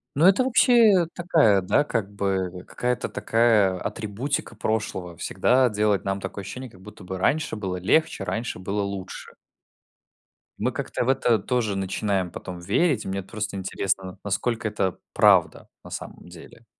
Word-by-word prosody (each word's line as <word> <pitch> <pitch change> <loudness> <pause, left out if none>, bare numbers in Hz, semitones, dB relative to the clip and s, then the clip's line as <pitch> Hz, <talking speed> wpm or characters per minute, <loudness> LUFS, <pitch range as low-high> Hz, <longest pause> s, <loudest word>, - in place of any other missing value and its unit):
Ну, 150 +5 +4
это 195 +7 +6
вообще 235 -7 +5
такая, 155 - +3
да, 95 +10 +2
как 115 -8 -2
бы 95 -3 -2
какая-то 125 0 -2
такая 110 -5 +2
атрибутика 115 +7 -3
прошлого- 105 -5 -3
всегда 125 +8 +2
делать 105 -2 +1
нам 95 0 -2
такое 100 - -6
ощущение, 125 +7 -7
как 95 -4 -18
будто 105 0 -12
бы 95 +1 -5
раньше 155 +10 +1
было 95 -4 -3
легче, 130 - +1
раньше 115 +2 -3
было 100 +3 -2
лучше. 100 -2 -6 1.2
Мы - - 0
как-то - - -3
в - - 0
это 125 -4 +3
тоже 110 -1 -1
начинаем 95 -1 -1
потом 90 -2 -7
верить. 110 - +1
Мне 95 0 -3
вот 95 - -18
просто 110 -2 -4
интересно, 95 -1 -2
насколько 115 +3 -1
это 100 -3 -1 0.2
правда - - +3
на - - -11
самом - - -8
деле. - - -14
105 Hz, 155 wpm, -24 LUFS, 95-125 Hz, 1.2 s, это